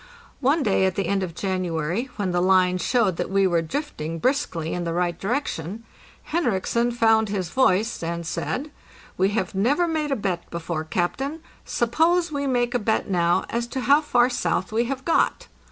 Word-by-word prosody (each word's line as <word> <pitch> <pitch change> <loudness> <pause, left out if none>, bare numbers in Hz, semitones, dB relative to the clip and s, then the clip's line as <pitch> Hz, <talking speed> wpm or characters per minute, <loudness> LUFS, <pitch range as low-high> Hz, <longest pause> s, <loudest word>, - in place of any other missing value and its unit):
One 285 +3 +2
day 195 -3 +2
at 190 -1 0
the 195 - -1
end 200 -1 0
of 175 -3 -4
January, 185 - -2
when 200 -4 -1
the 175 0 +1
line 185 0 +3
showed 205 -2 +1
that - - -2
we 195 0 +3
were 170 -3 +2
drifting 165 - -4
briskly 170 - -1
in 175 - -2
the 165 -1 -2
right 175 -1 0
direction, 215 - -3 0.4
Henriksen 240 - 0
found 225 -2 +3
his 190 -4 -2
voice 225 -3 +2
and 170 0 -3
said: 280 - -3 0.4
'We 190 +1 +2
have 185 -4 -1
never 270 - +2
made 310 -2 -1
a - - +2
bet 185 -6 -3
before, 165 -1 -4
captain; 270 - -2 0.2
suppose 325 +8 +1
we 280 -1 -2
make 245 -2 +1
a 245 - +2
bet 220 -2 0
now 175 -1 +2
as 235 0 -1
to 260 +2 -4
how 285 +4 +5
far 245 -5 +3
south 240 -6 -1
we 230 +2 +1
have 265 +1 -4
got." 330 - +1
205 Hz, 185 wpm, -24 LUFS, 180-260 Hz, 0.4 s, how